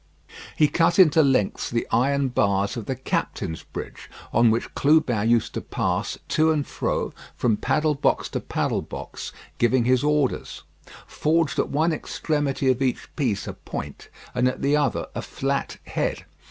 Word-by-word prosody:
He 150 Hz, -, +5 dB
cut 165 Hz, +2 st, +2 dB
into 160 Hz, -4 st, +7 dB
lengths 135 Hz, -8 st, +1 dB
the 115 Hz, 0 st, -1 dB
iron 135 Hz, +3 st, +2 dB
bars 100 Hz, -4 st, +1 dB
of 115 Hz, -4 st, -6 dB
the 130 Hz, -, -1 dB
captain's 80 Hz, -9 st, -3 dB
bridge -, -, -8 dB, 0.2 s
on 115 Hz, +1 st, +5 dB
which 115 Hz, +1 st, -1 dB
Clubin 135 Hz, -8 st, +3 dB
used 115 Hz, -2 st, +2 dB
to -, -, -3 dB
pass -, -, -2 dB
to 160 Hz, +1 st, +3 dB
and 150 Hz, -3 st, 0 dB
fro -, -, -2 dB, 0.2 s
from 115 Hz, -3 st, +2 dB
paddle 150 Hz, +8 st, +1 dB
box 140 Hz, -, +1 dB
to -, -, -2 dB
paddle -, -, -1 dB
box -, -, -7 dB, 0.3 s
giving 120 Hz, 0 st, +3 dB
his 130 Hz, +1 st, +3 dB
orders; 150 Hz, -3 st, 0 dB, 0.4 s
forged 160 Hz, -1 st, 0 dB
at -, -, +1 dB
one 160 Hz, +3 st, +1 dB
extremity 145 Hz, -3 st, 0 dB
of 130 Hz, +1 st, -2 dB
each 130 Hz, -2 st, -2 dB
piece 120 Hz, -10 st, -1 dB
a -, -, -4 dB
point, 70 Hz, 0 st, -7 dB, 0.2 s
and 125 Hz, +1 st, +2 dB
at 130 Hz, -, -2 dB
the 140 Hz, +1 st, +3 dB
other 145 Hz, -5 st, +1 dB
a -, -, -3 dB
flat 140 Hz, +1 st, -2 dB
head. -, -, -2 dB
135 Hz, 165 wpm, -24 LUFS, 120-150 Hz, 0.4 s, into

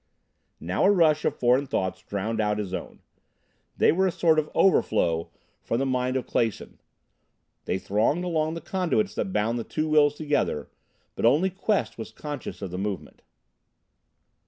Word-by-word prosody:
Now 90 Hz, -, 0 dB
a -, -, +6 dB
rush 155 Hz, -6 st, +3 dB
of -, -, +1 dB
foreign 125 Hz, +3 st, +3 dB
thoughts 95 Hz, -5 st, -2 dB
drowned 110 Hz, +4 st, -2 dB
out 105 Hz, 0 st, 0 dB
his 100 Hz, -3 st, -4 dB
own. -, -, -6 dB, 0.8 s
They -, -, +5 dB
were 190 Hz, +3 st, +2 dB
a -, -, 0 dB
sort 160 Hz, -2 st, +3 dB
of 155 Hz, -, -3 dB
overflow 85 Hz, -, +2 dB, 0.3 s
from 115 Hz, -, -2 dB
the 135 Hz, -, 0 dB
mind 130 Hz, 0 st, 0 dB
of 130 Hz, -, -3 dB
Clason. 115 Hz, -3 st, -2 dB, 0.9 s
They -, -, 0 dB
thronged 110 Hz, -, 0 dB
along 160 Hz, -2 st, -1 dB
the 165 Hz, -, -6 dB
conduits 190 Hz, +2 st, 0 dB
that 190 Hz, -, -3 dB
bound 115 Hz, -, 0 dB
the -, -, -3 dB
two 155 Hz, +6 st, -2 dB
wills 150 Hz, -1 st, +4 dB
together, 145 Hz, -, -1 dB, 0.4 s
but -, -, -6 dB
only 150 Hz, +11 st, +4 dB
Quest 190 Hz, -, -1 dB
was 110 Hz, -, -6 dB
conscious 145 Hz, -2 st, -7 dB
of 95 Hz, -, -5 dB
the 90 Hz, -, -4 dB
movement. 95 Hz, -6 st, -5 dB
130 Hz, 165 wpm, -26 LUFS, 105-160 Hz, 0.9 s, a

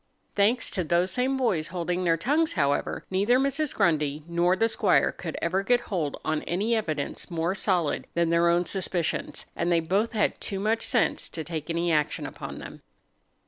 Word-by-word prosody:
Thanks 215 Hz, +4 st, +3 dB
to 185 Hz, -, -1 dB
those 175 Hz, +3 st, +1 dB
same 260 Hz, +2 st, +1 dB
boys 190 Hz, -12 st, 0 dB
holding 180 Hz, +1 st, -2 dB
their 165 Hz, -2 st, +2 dB
tongues, 305 Hz, -, +1 dB
however, 140 Hz, 0 st, 0 dB
neither 205 Hz, +6 st, +3 dB
Mrs. 275 Hz, +2 st, 0 dB
Grundy 150 Hz, -2 st, +1 dB
nor 170 Hz, +2 st, +2 dB
the 225 Hz, +4 st, +2 dB
squire 220 Hz, -, +2 dB
could -, -, -6 dB
ever 185 Hz, +3 st, +1 dB
get 245 Hz, +4 st, +2 dB
hold 165 Hz, -8 st, -3 dB
on 155 Hz, -1 st, 0 dB
any 210 Hz, +7 st, 0 dB
evidence 155 Hz, -10 st, -3 dB
more 170 Hz, +1 st, -1 dB
solid 180 Hz, -6 st, 0 dB
than 170 Hz, -1 st, +2 dB
their 170 Hz, +1 st, +3 dB
own 175 Hz, +1 st, +2 dB
suspicions, 180 Hz, -3 st, -2 dB
and 175 Hz, -, 0 dB
they 170 Hz, -, +4 dB
both 195 Hz, +8 st, 0 dB
had 210 Hz, -2 st, 0 dB
too 195 Hz, -, -3 dB
much 220 Hz, +3 st, 0 dB
sense 240 Hz, -4 st, +1 dB
to 160 Hz, -, -5 dB
take 160 Hz, -2 st, -6 dB
any 170 Hz, +1 st, 0 dB
action 150 Hz, -2 st, 0 dB
upon -, -, -7 dB
them. -, -, -10 dB
180 Hz, 185 wpm, -26 LUFS, 165-220 Hz, -, they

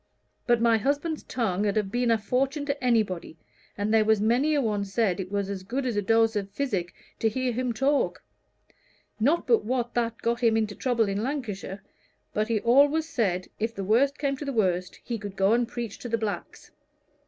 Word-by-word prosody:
But 240 Hz, -1 st, +4 dB
my 230 Hz, -1 st, +4 dB
husband's 290 Hz, +6 st, -1 dB
tongue 210 Hz, -4 st, -1 dB
'ud 200 Hz, -, 0 dB
have 210 Hz, -3 st, 0 dB
been 245 Hz, +1 st, +1 dB
a 230 Hz, -, +4 dB
fortune 265 Hz, +7 st, -1 dB
to 280 Hz, -1 st, -3 dB
anybody, 215 Hz, -9 st, 0 dB, 0.4 s
and 205 Hz, +2 st, 0 dB
there 220 Hz, -1 st, +5 dB
was 220 Hz, -1 st, +3 dB
many 245 Hz, +8 st, +2 dB
a -, -, +3 dB
one 210 Hz, -4 st, 0 dB
said 200 Hz, -2 st, 0 dB
it 190 Hz, 0 st, -5 dB
was 200 Hz, -1 st, -1 dB
as 195 Hz, -1 st, -4 dB
good 255 Hz, +8 st, -3 dB
as 245 Hz, -4 st, -1 dB
a 205 Hz, -, +1 dB
dose 225 Hz, +2 st, +3 dB
of 200 Hz, -1 st, -2 dB
physic 200 Hz, -7 st, -2 dB, 0.2 s
to 225 Hz, -, +2 dB
hear 255 Hz, +3 st, -1 dB
him 250 Hz, +1 st, -1 dB
talk; 270 Hz, +5 st, 0 dB, 1.0 s
not 290 Hz, +10 st, +2 dB
but 235 Hz, -5 st, +3 dB
what 240 Hz, +1 st, -1 dB
that 230 Hz, -1 st, -1 dB
got 235 Hz, 0 st, +1 dB
him 230 Hz, -2 st, +3 dB
into 215 Hz, -2 st, 0 dB
trouble 235 Hz, -1 st, +1 dB
in 200 Hz, +1 st, -1 dB
Lancashire, 215 Hz, -7 st, -4 dB, 0.5 s
but 215 Hz, +1 st, 0 dB
he 225 Hz, -2 st, +1 dB
always 285 Hz, +6 st, +4 dB
said, 195 Hz, -, -1 dB
if 225 Hz, +1 st, -2 dB
the 195 Hz, -, -4 dB
worst 255 Hz, +8 st, +3 dB
came 280 Hz, -1 st, 0 dB
to 290 Hz, -, -6 dB
the 280 Hz, -, -2 dB
worst, 185 Hz, -6 st, 0 dB
he 235 Hz, -2 st, -4 dB
could 200 Hz, -1 st, -7 dB
go 195 Hz, +2 st, +3 dB
and 240 Hz, 0 st, +2 dB
preach 235 Hz, -3 st, -6 dB
to 245 Hz, -, -6 dB
the 230 Hz, -, +1 dB
blacks. 215 Hz, -2 st, -5 dB
230 Hz, 210 wpm, -27 LUFS, 205-255 Hz, 1.0 s, there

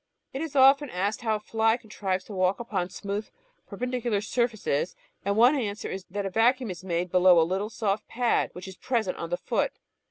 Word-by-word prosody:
It 270 Hz, -, -3 dB
is 320 Hz, -3 st, -5 dB
often 275 Hz, +1 st, +6 dB
asked 200 Hz, +3 st, -2 dB
how 220 Hz, -2 st, +1 dB
a -, -, -3 dB
fly 225 Hz, +2 st, +1 dB
contrives 200 Hz, -5 st, -3 dB
to 210 Hz, -, -10 dB
walk 185 Hz, 0 st, +1 dB
up 190 Hz, -6 st, -3 dB
smooth, 205 Hz, +2 st, -4 dB, 0.4 s
perpendicular 245 Hz, -4 st, -2 dB
surfaces, 220 Hz, -, -1 dB, 0.3 s
and 200 Hz, +1 st, 0 dB
one 245 Hz, +5 st, +7 dB
answer 210 Hz, -6 st, -3 dB
is 190 Hz, 0 st, -6 dB
that 200 Hz, +2 st, -3 dB
a 195 Hz, -, -3 dB
vacuum 240 Hz, +2 st, +2 dB
is 180 Hz, 0 st, -9 dB
made 175 Hz, -1 st, -2 dB
below 180 Hz, -1 st, +6 dB
a 160 Hz, -, +4 dB
httle 195 Hz, +5 st, -2 dB
soft 210 Hz, -2 st, -1 dB
pad 240 Hz, 0 st, +1 dB
which 180 Hz, +1 st, -9 dB
is 190 Hz, -1 st, -10 dB
present 225 Hz, -7 st, -1 dB
on 170 Hz, -, -5 dB
the 175 Hz, -, -1 dB
foot. -, -, -1 dB
210 Hz, 200 wpm, -27 LUFS, 185-235 Hz, 0.4 s, one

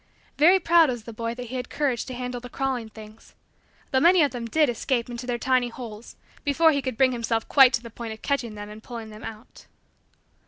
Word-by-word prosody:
Very 350 Hz, +6 st, +6 dB
proud 335 Hz, -3 st, +5 dB
was 240 Hz, -3 st, -4 dB
the 230 Hz, -, -9 dB
boy 230 Hz, +1 st, -4 dB
that 250 Hz, -, -6 dB
he 250 Hz, +2 st, -7 dB
had 250 Hz, -, -5 dB
courage 280 Hz, -5 st, -1 dB
to 255 Hz, -, -7 dB
handle 250 Hz, 0 st, -5 dB
the 245 Hz, -, -9 dB
crawling 255 Hz, -4 st, -2 dB
things 215 Hz, 0 st, -14 dB, 0.6 s
though 260 Hz, -, +3 dB
many 345 Hz, +2 st, +6 dB
of 285 Hz, -, +1 dB
them 240 Hz, -2 st, -5 dB
did 305 Hz, +5 st, +3 dB
escape 240 Hz, 0 st, -1 dB
into 240 Hz, +1 st, -6 dB
their 245 Hz, -1 st, -1 dB
tiny 255 Hz, 0 st, +1 dB
holes 230 Hz, -2 st, -9 dB, 0.3 s
before 320 Hz, +3 st, +4 dB
he 280 Hz, -2 st, 0 dB
could 260 Hz, -3 st, -4 dB
bring 260 Hz, 0 st, +4 dB
himself 230 Hz, -2 st, -2 dB
quite 270 Hz, -3 st, +7 dB
to 235 Hz, -, 0 dB
the 230 Hz, -, -9 dB
point 230 Hz, 0 st, -7 dB
of 220 Hz, -, -10 dB
catching 245 Hz, -6 st, -1 dB
them 205 Hz, 0 st, -7 dB
and 210 Hz, +1 st, -11 dB
pulling 230 Hz, -2 st, -8 dB
them 215 Hz, +2 st, -11 dB
out. 225 Hz, +1 st, -11 dB
245 Hz, 230 wpm, -25 LUFS, 230-270 Hz, 0.6 s, quite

